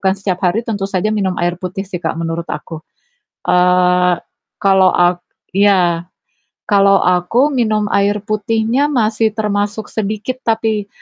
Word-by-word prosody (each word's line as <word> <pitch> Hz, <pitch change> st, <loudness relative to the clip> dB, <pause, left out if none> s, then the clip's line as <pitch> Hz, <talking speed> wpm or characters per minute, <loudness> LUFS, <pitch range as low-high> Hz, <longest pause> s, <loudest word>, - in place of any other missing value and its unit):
setiap 190 Hz, -1 st, -3 dB
hari 195 Hz, +6 st, 0 dB
tentu 205 Hz, -3 st, -2 dB
saja 195 Hz, +2 st, -1 dB
minum 190 Hz, -3 st, -1 dB
air 175 Hz, 0 st, 0 dB
putih 185 Hz, +1 st, -5 dB
sih, 180 Hz, -3 st, -5 dB
Kak, -, -, -2 dB
menurut 165 Hz, 0 st, -3 dB
aku. 160 Hz, -2 st, -6 dB, 0.7 s
Eee, 180 Hz, 0 st, +3 dB, 0.5 s
kalau 190 Hz, -1 st, +5 dB
ak 175 Hz, 0 st, +2 dB, 0.4 s
iya, 180 Hz, -4 st, +3 dB, 0.6 s
kalau 200 Hz, -1 st, +4 dB
aku 180 Hz, +11 st, +2 dB
minum 215 Hz, -4 st, +1 dB
air 200 Hz, +1 st, +1 dB
putihnya 225 Hz, +5 st, 0 dB
masih 220 Hz, -3 st, +1 dB
termasuk 210 Hz, 0 st, -2 dB
sedikit 215 Hz, +4 st, -3 dB
tapi, 220 Hz, -2 st, 0 dB
200 Hz, 130 wpm, -16 LUFS, 180-215 Hz, 0.7 s, kalau